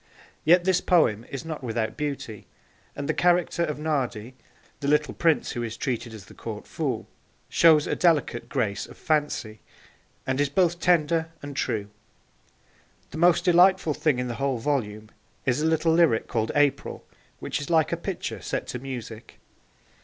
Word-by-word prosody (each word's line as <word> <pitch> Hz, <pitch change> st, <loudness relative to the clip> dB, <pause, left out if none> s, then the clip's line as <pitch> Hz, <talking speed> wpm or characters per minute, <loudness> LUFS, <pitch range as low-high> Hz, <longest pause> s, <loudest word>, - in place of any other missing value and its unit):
Yet 175 Hz, +3 st, +5 dB
this 185 Hz, 0 st, +2 dB
poem 120 Hz, -, +2 dB
is 140 Hz, +3 st, -6 dB
not 155 Hz, -3 st, -6 dB
without 110 Hz, -2 st, -2 dB
beauty, 140 Hz, -8 st, -5 dB, 0.5 s
and 140 Hz, -, -4 dB
the -, -, +1 dB
character 175 Hz, -1 st, +2 dB
of 150 Hz, -3 st, -2 dB
Nardi, 130 Hz, -7 st, -2 dB, 0.5 s
the 140 Hz, -, -3 dB
little 150 Hz, +1 st, +2 dB
prince 165 Hz, -3 st, +1 dB
who 120 Hz, -, -4 dB
is 115 Hz, -1 st, -5 dB
treated 120 Hz, -2 st, -3 dB
as 110 Hz, -3 st, -10 dB
the -, -, -15 dB
Court -, -, -7 dB
fool, -, -, -3 dB, 0.4 s
shows 160 Hz, -3 st, +5 dB
a -, -, -1 dB
delicate 155 Hz, -9 st, +1 dB
grace 100 Hz, -2 st, -1 dB
of -, -, -14 dB
fancy, 145 Hz, -8 st, -1 dB, 0.7 s
and 130 Hz, +1 st, 0 dB
is 145 Hz, -, +1 dB
both 175 Hz, +2 st, +1 dB
tender 165 Hz, -1 st, +2 dB
and 145 Hz, -1 st, -7 dB
true. 105 Hz, -6 st, -2 dB, 1.2 s
The 160 Hz, -, -6 dB
most 175 Hz, +1 st, +4 dB
delightful 180 Hz, -2 st, +5 dB
thing 150 Hz, -3 st, +1 dB
in 125 Hz, 0 st, -2 dB
the 120 Hz, -, -3 dB
whole 135 Hz, -2 st, 0 dB
volume 110 Hz, -5 st, -2 dB, 0.3 s
is 130 Hz, +3 st, +1 dB
a 160 Hz, -, +2 dB
little 160 Hz, 0 st, +2 dB
lyric 165 Hz, -9 st, +3 dB
called 110 Hz, -1 st, -1 dB
April, 145 Hz, -1 st, +1 dB, 0.3 s
which -, -, -4 dB
is 140 Hz, -, -6 dB
like 160 Hz, -2 st, +3 dB
a -, -, +1 dB
picture 175 Hz, +2 st, -5 dB
set -, -, -3 dB
to 125 Hz, -, -4 dB
music. 120 Hz, -4 st, -8 dB
145 Hz, 170 wpm, -25 LUFS, 120-165 Hz, 1.2 s, Yet